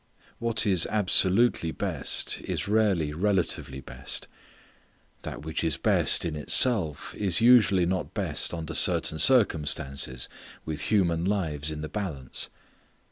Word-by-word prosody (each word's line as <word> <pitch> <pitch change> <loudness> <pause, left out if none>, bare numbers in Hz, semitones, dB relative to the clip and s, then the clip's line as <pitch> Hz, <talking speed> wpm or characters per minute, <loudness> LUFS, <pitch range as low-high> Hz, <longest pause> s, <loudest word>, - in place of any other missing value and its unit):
What 115 -2 -1
is 95 -5 +3
absolutely 100 -1 +2
best - - -2
is - - -4
rarely 100 -8 0
relatively 90 -7 -1
best. 65 0 -4 0.9
That - - -8
which 80 +1 -4
is 80 -1 +1
best - - +1
in 80 -2 -3
itself 80 - +3
is 100 -3 +2
usually 115 -6 +4
not 90 -1 -3
best - - -1
under 80 -1 -6
certain 80 +1 +2
circumstances, 75 - +1 0.4
with 75 -2 -3
human 85 -6 +1
lives 80 -7 -2
in 75 -1 -6
the 75 - -5
balance. 80 -10 -5
85 Hz, 125 wpm, -26 LUFS, 75-105 Hz, 0.9 s, usually